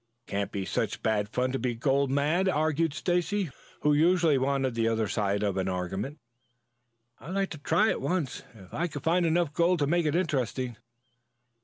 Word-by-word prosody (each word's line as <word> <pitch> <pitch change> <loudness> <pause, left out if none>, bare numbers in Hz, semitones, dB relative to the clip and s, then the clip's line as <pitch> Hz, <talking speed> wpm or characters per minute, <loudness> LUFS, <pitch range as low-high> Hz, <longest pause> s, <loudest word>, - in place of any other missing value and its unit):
"It - - -17
can't 100 0 -1
be 100 -1 -3
such - - -2
bad 105 -2 +1
fun 125 +3 0
to 135 - -2
be 125 -2 -1
gold 135 +3 +1
mad," 155 +7 +2
argued 160 -1 +1
Stacy, 180 +1 0 0.3
who 150 0 +3
usually 160 -1 +4
wanted 135 -1 0
the 115 -1 +1
other 110 -1 +1
side 100 0 0
of 100 -2 0
an 95 0 0
argument. 95 - -3 1.0
"I'd 180 +6 -7
like 195 -1 0
to 155 - -7
try 170 +9 +3
it - - -3
once, 170 -8 -1
if 95 -4 -15
I 175 - 0
could 145 -3 -7
find 170 +2 +2
enough 165 -2 +1
gold 175 +2 +3
to 145 - +1
make 170 +2 +1
it 150 - 0
interesting." 130 - -1
140 Hz, 190 wpm, -28 LUFS, 115-170 Hz, 1.0 s, usually